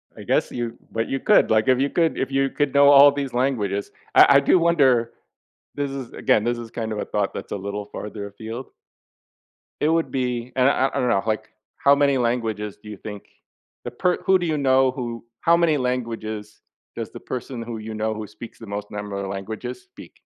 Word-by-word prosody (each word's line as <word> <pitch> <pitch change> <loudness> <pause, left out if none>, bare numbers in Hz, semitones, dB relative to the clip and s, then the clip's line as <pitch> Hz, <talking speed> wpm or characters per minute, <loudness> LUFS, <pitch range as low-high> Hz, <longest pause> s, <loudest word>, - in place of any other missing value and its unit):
I - - -10
guess - - +1
you 120 -2 -4
but 115 0 -2
you 135 - -1
could, - - +4
like, 110 +2 +3
if 130 -1 +4
you 140 +1 +1
could 165 +1 +1
if 135 0 -2
you 135 0 +1
could 145 -2 -1
know 140 0 +6
all 145 0 +9
these 140 -3 -4
languages, 110 -6 -1 0.2
I 140 - +8
I - - +7
do 155 +6 +4
wonder 135 -9 +3 0.6
this 145 -1 -2
is, 135 -3 -6
again, 105 - +2
this 120 +1 -1
is 115 -1 -8
kind 110 -1 -4
of 105 - -4
a - - -2
thought 100 -2 -1
that's - - -7
a - - -1
little 100 +1 -5
farther 105 0 -7
afield 110 +5 -8 1.1
it 150 - +3
would 165 0 +1
be 125 -2 -2
and 130 0 +4
I 140 - +5
I 135 - +2
I - - +1
don't 125 - +1
know, 95 - +2
like, 110 -1 -1 0.3
how 140 0 +5
many 140 -1 +3
languages 115 -4 -1
do 105 - -11
you 105 - -7
think 105 0 -8 0.6
the - - -4
per 180 +8 +1
who 190 -1 +4
do 175 - -2
you 155 -2 0
know 130 -1 +3
who 120 -3 -5 0.2
how 170 0 +5
many 165 -3 +3
languages 115 -4 -4 0.3
does - - -5
the - - -9
person 125 -1 -6
who 115 0 -6
you 110 0 -7
know 110 +1 -1
who 110 0 -6
speaks 105 +3 -11
the 115 - -10
most 105 0 -5
number 105 -1 -5
of 100 -1 -4
languages 110 - -6
speak? 380 - -14
120 Hz, 220 wpm, -23 LUFS, 110-140 Hz, 1.1 s, all